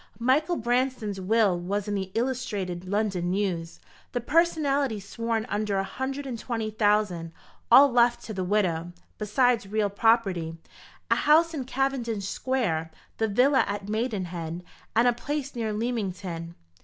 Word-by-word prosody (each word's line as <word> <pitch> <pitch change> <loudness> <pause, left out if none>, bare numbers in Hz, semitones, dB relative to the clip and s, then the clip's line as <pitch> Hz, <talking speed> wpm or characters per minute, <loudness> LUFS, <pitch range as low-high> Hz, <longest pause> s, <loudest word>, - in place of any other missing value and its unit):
Michael 280 +8 +2
Branston's 240 - -1
will 200 -2 +2
was 200 +4 -2
in 205 - -2
the 190 -2 -2
Illustrated 210 -8 -2
London 195 -3 -1
News; 180 -4 -2 0.3
the 245 - 0
personalty 285 -4 +1
sworn 225 +2 -2
under 210 -3 -1
a 195 - +1
hundred 270 +6 -4
and 245 -4 -5
twenty 225 -2 -3
thousand, 205 -6 +1 0.4
all 275 +3 +8
left 240 0 +3
to 220 - -6
the 190 -2 -2
widow, 175 -3 0 0.3
besides 220 0 +2
real 210 0 0
property 195 -7 +1 0.5
a - - +6
house 330 +2 +4
in 275 -5 -3
Cavendish 245 -6 -1
Square, 200 -11 -1 0.3
the 220 - +2
villa 255 +6 +4
at 200 0 -4
Maidenhead, 180 -7 -3 0.3
and 235 +2 +5
a 245 - +4
place 285 +3 -4
near 230 -3 -2
Leamington." 190 -7 -3
215 Hz, 145 wpm, -27 LUFS, 195-250 Hz, 0.5 s, all